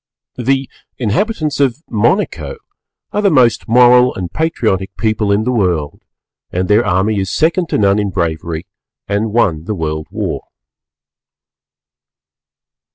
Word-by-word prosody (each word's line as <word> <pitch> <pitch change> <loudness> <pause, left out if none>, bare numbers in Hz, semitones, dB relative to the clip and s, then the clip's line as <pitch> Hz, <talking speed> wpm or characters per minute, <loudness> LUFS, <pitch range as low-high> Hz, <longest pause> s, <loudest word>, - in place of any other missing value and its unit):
The 135 +2 0 0.3
inhabitants 150 - -1
of 140 +2 +1
Monaco 120 - 0 0.5
are 210 - 0
the 200 - +4
most 125 -9 +3
Moral 125 +1 +5
and 90 -2 -5
Patriotic 110 - -1
people 110 -2 0
in 100 +2 +2
the 125 - 0
World, 90 -10 -1 0.5
and 90 +1 -2
their 105 +3 +4
army 100 +3 +1
is 95 -1 -2
second 170 - +1
to - - 0
none 100 0 +3
in 105 -1 -1
bravery 85 -2 -3 0.4
and 105 +2 -1
won 85 -9 +1
the 105 - -3
World 80 -2 -3
War. - - -4
110 Hz, 130 wpm, -16 LUFS, 95-125 Hz, 0.5 s, Moral